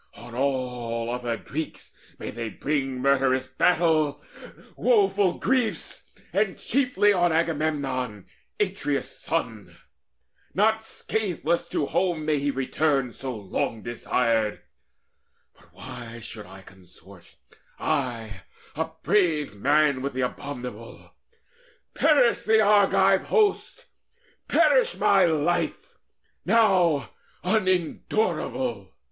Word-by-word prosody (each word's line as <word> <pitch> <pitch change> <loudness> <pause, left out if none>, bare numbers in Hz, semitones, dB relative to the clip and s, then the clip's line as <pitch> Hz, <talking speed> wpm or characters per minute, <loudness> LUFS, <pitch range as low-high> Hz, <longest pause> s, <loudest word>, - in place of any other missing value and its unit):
On 120 0 -12
all 125 -3 -2
other 120 -2 -2
Greeks 155 +7 -6 0.2
May - - -6
they 115 0 -5
bring 135 0 -2
murderous 135 -1 +2
battle, 155 +1 +1 0.5
woeful 390 - +2
griefs, 255 -4 -1 0.3
And 200 -1 +1
chiefly 240 -6 +2
on 175 -2 +2
Agamemnon, 145 - -1 0.3
Atreus' 185 -8 -1
son! 115 - -3 0.8
Not 220 +3 +2
scatheless 175 -7 -2
to - - -2
the - - +1
home 175 -1 -1
may 150 -2 +1
he 145 +1 -1
return 135 -1 0
So 130 -3 -5
long 105 +2 -3
desired! 115 -2 0 0.9
But - - -24
why 120 -2 -9
should 110 -2 -8
I 95 +1 -13
consort, 95 -1 -16 0.4
I, 115 -7 -2 0.3
a 160 +2 -1 0.2
brave 160 - +1
man, 145 +4 +2
with 140 +1 -3
the 130 - -2
abominable? 125 -3 -6 0.8
Perish 275 -7 +4
the 220 0 +3
Argive 195 -2 +4
host, 440 +3 +1 0.6
perish - - +3
my 195 -2 +4
life, 165 +1 -1 0.4
Now 180 - +3 0.3
unendurable! 180 - -1
145 Hz, 100 wpm, -25 LUFS, 125-185 Hz, 0.9 s, Perish